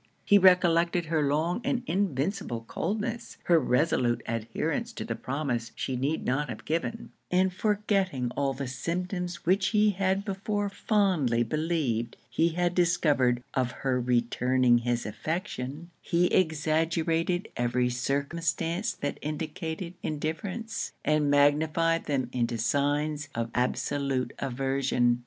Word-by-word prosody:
He 205 - +6
recollected 175 -2 +4
her 160 -1 +1
long 160 - 0
and 250 -1 0
invincible 175 - -1
coldness; 210 - -3
her 170 -2 +5
resolute 125 -3 +1
adherence 115 -1 -2
to - - -5
the - - -2
promise 130 -4 -3
she 130 - -2
need 140 +5 -1
not 145 +4 0
have - - -7
given; 165 +8 -2 0.2
and 185 +1 +2
forgetting 195 - 0
all 140 +1 0
the 140 +1 -4
symptoms 175 +6 -3
which 190 +2 +3
he 210 0 +4
had 195 +1 0
before 205 +1 -2
fondly 185 - +2
believed 150 -4 -1
he 165 - +3
had 175 +1 0
discovered 145 -8 +2
of 130 -2 +1 0.2
her 130 -1 +2
returning 125 0 +3
his 120 0 -1
affection, 155 - -4
he 170 +1 +2
exaggerated 165 +1 +1
every 125 +1 +1
circumstance 165 - -1
that 145 - -4
indicated 160 +3 -4
indifference, 185 +9 -3
and 150 -1 +2
magnified 155 +3 +3
them 135 -4 0
into 120 -1 0
signs 145 +5 0
of 115 0 -2
absolute 130 +1 -1
aversion. 135 -2 +1
155 Hz, 125 wpm, -28 LUFS, 130-180 Hz, 0.2 s, He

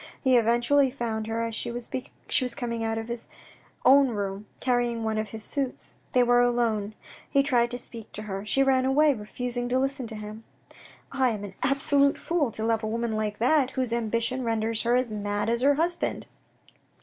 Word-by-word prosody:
He 260 -2 +3
eventually 240 +4 +3
found 225 -4 -3
her 225 +1 -1
as 230 0 -3
she 235 +2 -2
was 240 0 -6 0.7
coming 235 -4 -3
out 225 0 -1
of 225 0 -4
his 235 -1 -3 0.6
own 275 +1 +7
room, 200 -2 -4
carrying 240 -2 0
one 220 -1 -1
of 215 -1 -3
his 220 +1 -7
suits. 270 +2 -4 0.2
They 250 -2 +5
were 245 0 +4
alone. 230 -4 0 0.3
He 275 - +3
tried 240 -4 +2
to 245 - -4
speak 230 -3 -9
to 215 - -5
her. 195 -2 -5
She 270 +6 +2
ran 260 -1 +3
away, 290 +3 +4
refusing 245 +2 -4
to 255 - +2
listen 270 -1 -1
to 220 - -5
him. 215 +1 -8 0.4
" - - -22
I 265 -2 +2
am 210 -3 -4
an 200 -2 -7
absolute 280 +1 +3
fool 330 -6 0
to 220 0 -4
love 225 0 +1
a 215 - -3
woman 230 +1 -2
like 215 -1 -2
that, 260 +3 +3
whose 255 -3 0
ambition 235 +2 0
renders 225 -1 0
her 240 +1 +2
as 250 -2 +1
mad 205 0 -2
as 235 +1 0
her 280 +2 +4
husband." 340 +3 0
235 Hz, 195 wpm, -26 LUFS, 220-260 Hz, 0.7 s, own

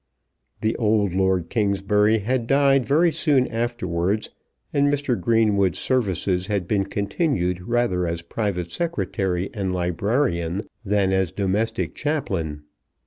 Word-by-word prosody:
The 110 +1 0
old 105 -4 +2
Lord 95 -2 +1
Kingsbury 105 0 +2
had 115 +3 -1
died 135 -1 +3
very 165 +4 +4
soon 145 -5 +2
afterwards, 110 -5 -2 0.4
and 145 0 +3
Mr. 145 -3 0
Greenwood's 105 -6 +2
services 95 -7 0
had 100 -4 -1
been 100 -1 +1
continued 100 - -1
rather 95 -4 0
as 85 0 -3
private 90 -3 -3
secretary 95 - -2
and 95 -3 -2
librarian 90 - -1 0.2
than 100 -2 +1
as 95 -3 +1
domestic 100 -2 -1
chaplain. 95 - -2
100 Hz, 120 wpm, -23 LUFS, 90-120 Hz, 0.4 s, very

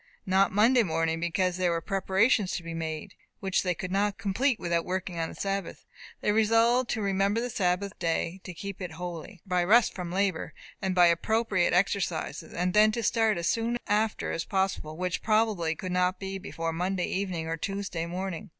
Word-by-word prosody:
Not 190 +1 +3
Monday 230 +5 +5
morning, 165 -4 0
because 180 +2 0
there 180 -1 +2
were 170 -1 0
preparations 195 +2 +1
to 175 - -3
be 165 0 -6
made, 160 +3 -5 0.3
which 190 -1 0
they 180 -2 -1
could 180 +2 -5
not 200 +1 +1
complete 225 +5 0
without 170 -1 0
working 180 -1 -3
on 165 - -1
the - - -10
Sabbath, 195 0 -3 0.4
They - - +2
resolved 230 +3 +3
to 220 - -1
"remember 195 +2 +1
the 245 +1 -3
Sabbath 190 0 -1
day 170 +2 -1
to 185 - -7
keep 195 +2 -7
it 180 -3 -5
holy," 175 +2 -7
by 180 -2 +1
rest 225 +6 +5
from 180 -2 -5
labour, 190 -3 -1 0.3
and 190 -2 -1
by 180 -1 +7
appropriate 185 +2 +2
exercises, 180 -2 0
and 180 +1 -1
then 215 +1 +6
to 235 - -2
start 220 -2 +2
as 170 - -3
soon 230 +1 0
after 215 +1 0
as 165 - -2
possible; 190 -6 -1
which, 180 0 -2
probably, 215 -7 +1
could 185 +3 -5
not 180 +1 +1
be 195 0 -5
before 165 -4 -4
Monday 180 +2 -1
evening 185 -4 -2
or 165 0 -2
Tuesday 185 -1 -3
morning. 185 +2 -5
190 Hz, 190 wpm, -28 LUFS, 175-205 Hz, 0.4 s, by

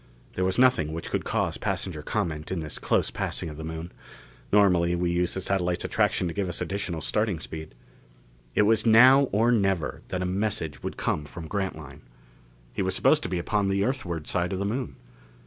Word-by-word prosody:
There 90 - -1
was 95 0 +1
nothing 125 -12 +3
which 80 - -6
could - - -1
cause - - -1
passenger 80 -5 -2
comment 80 -4 -3
in 95 - -1
this 75 -2 -6
close - - +1
passing - - -3
of 75 - -9
the 80 - -6
Moon; 80 +2 -6 0.6
normally 90 -4 +4
we 85 0 0
used 90 0 0
the 95 - -2
satellite's 90 -2 0
attraction 90 - +1
to 85 - -4
give 95 -1 -2
us 85 - -4
additional 95 -4 -3
starting 105 -2 0
speed. 80 -3 -8 0.8
It - - +5
was 110 +1 +3
now 130 +5 +7
or 115 +4 +3
never 95 - 0
that 90 -1 -2
a - - -1
message 90 -6 -2
would - - -5
come 75 - -1
from 80 +2 -8
Grantline. 80 -7 -4 0.7
He - - -2
was - - -1
supposed - - +4
to - - -4
be 90 - -1
upon 100 +3 0
the 100 +1 +1
Earthward 85 - -3
side 90 0 0
of - - -2
the 100 - -2
Moon. 120 +5 -3
90 Hz, 200 wpm, -26 LUFS, 80-105 Hz, 0.8 s, now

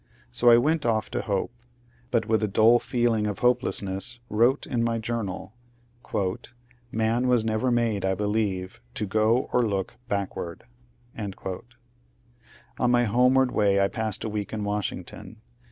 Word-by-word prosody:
So 120 - +4
I 115 - +8
went 155 +5 +2
off 110 -2 0
to - - -1
hope, 100 +2 -2 0.6
but 115 -3 +1
with 110 0 +1
a 105 - +1
dull 110 +4 +5
feeling 120 -4 0
of 105 - -3
hopelessness 120 -2 0
wrote 120 +6 +3
in 120 -3 -1
my 115 0 0
journal, 110 -4 -4 0.5
^^ 100 +4 -2 0.4
Man 115 +3 +1
was 120 -3 +3
never 110 +3 0
made, 115 -5 +1
I 95 0 +1
believe, 105 - -2
to 105 - -1
go 110 +5 +2
or 125 - +4
look 100 -5 -2
backward." 100 -5 -4 0.6
On 120 +4 -7
my 120 0 +4
homeward 125 +3 +3
way 100 -2 +3
I 100 0 +3
passed 110 -3 -2
a 110 - -2
week 105 -1 -4
in 110 -1 -3
Washington. 105 -1 -4
110 Hz, 150 wpm, -26 LUFS, 105-120 Hz, 0.6 s, I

